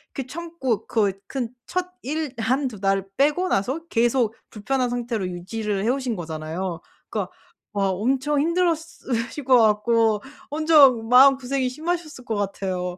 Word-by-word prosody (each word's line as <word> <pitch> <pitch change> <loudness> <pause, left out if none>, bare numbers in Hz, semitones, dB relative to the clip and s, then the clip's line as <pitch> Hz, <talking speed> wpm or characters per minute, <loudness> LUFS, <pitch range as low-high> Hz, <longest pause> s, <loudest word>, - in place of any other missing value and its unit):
이렇게 270 - -3
참고 295 -8 -3
거의 205 -4 +1
근 255 -4 -3 0.2
첫 365 0 -3
일 300 0 -3
1-2 250 -1 0
달 195 0 +1
빼고 300 +7 +2
나서 265 - -1
계속 235 -4 +1
불편한 250 +4 -1
상태로 235 -5 -2
유지를 195 +3 -3
해 225 - +1
오신 255 -2 -1
거잖아요. 165 +1 -4 0.3
그러니까 - - -3 0.4
와 200 -1 +1
엄청 265 +9 0
힘들었으실 320 -7 -1
것 255 -1 +5
같고 220 0 +3 0.3
완전 290 -6 +5
마음고생이 265 +1 +5
심하셨을 310 -1 -4
것 225 - -2
같아요. 185 -3 -3
245 Hz, 290 characters per minute, -23 LUFS, 205-280 Hz, 0.4 s, 것